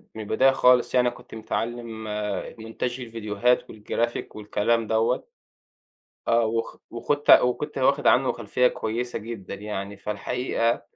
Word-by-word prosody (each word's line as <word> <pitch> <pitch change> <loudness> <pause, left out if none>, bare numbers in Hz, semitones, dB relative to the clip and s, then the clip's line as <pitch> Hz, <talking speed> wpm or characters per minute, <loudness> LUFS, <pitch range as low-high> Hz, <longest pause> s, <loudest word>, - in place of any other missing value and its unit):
من 110 - -5
البداية 130 +6 +4
خالص 125 -1 +4
يعني 125 -1 +4
أنا - - -2
كنت - - -13
متعلّم 115 0 -4 0.6
مونتاج 120 +3 -4
الفيديوهات 115 +1 0
والجرافيك 115 +2 -3
والكلام 110 +2 0
دوّة. 110 - +1 1.0
آه، 115 0 +4
وخ 115 +1 -2
وخَدت 135 +5 0
وكنت 140 +4 +4
واخِد 140 +2 +2
عنه 130 +1 +4
خلفِيَّة 120 +2 +1
كويسة 120 +2 -3
جدًا 110 -3 -7
يعني. 100 -1 -5
فالحقيقة 115 +3 -1
115 Hz, 125 wpm, -25 LUFS, 110-125 Hz, 1.0 s, البداية